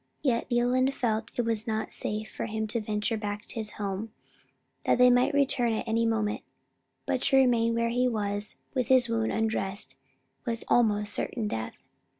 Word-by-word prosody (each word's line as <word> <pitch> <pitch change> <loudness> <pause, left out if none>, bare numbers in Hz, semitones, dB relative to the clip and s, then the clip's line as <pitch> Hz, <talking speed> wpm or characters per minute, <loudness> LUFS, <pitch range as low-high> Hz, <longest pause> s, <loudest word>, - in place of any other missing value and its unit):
Yet 240 -5 +1
Leland 255 +2 +2
felt 220 -2 0
that - - -18
it 245 - +1
was 225 0 -1
not 220 -1 -2
safe 215 +1 -3
for - - -3
him 220 0 -2
to 230 +1 -1
venture 210 +1 -1
back 210 0 -4
to - - -12
his 220 -3 -1
home, 205 +2 -4 0.7
as - - +3
they 250 0 +7
might 245 +1 +4
return 255 -4 +2
at 220 - -3
any 230 +1 +2
moment; 215 -2 0 0.6
but 255 - 0
to 275 -1 +3
remain 235 -3 +4
where 230 0 +1
he 250 +2 +2
was 205 -3 -2 0.2
with 255 -4 0
his 255 -2 +5
wound 225 -1 0
undressed 195 -10 -1 0.5
was 230 -2 -3
almost 210 -3 +3
certain 225 -4 -2
death. 110 - -4
225 Hz, 180 wpm, -28 LUFS, 210-245 Hz, 0.7 s, they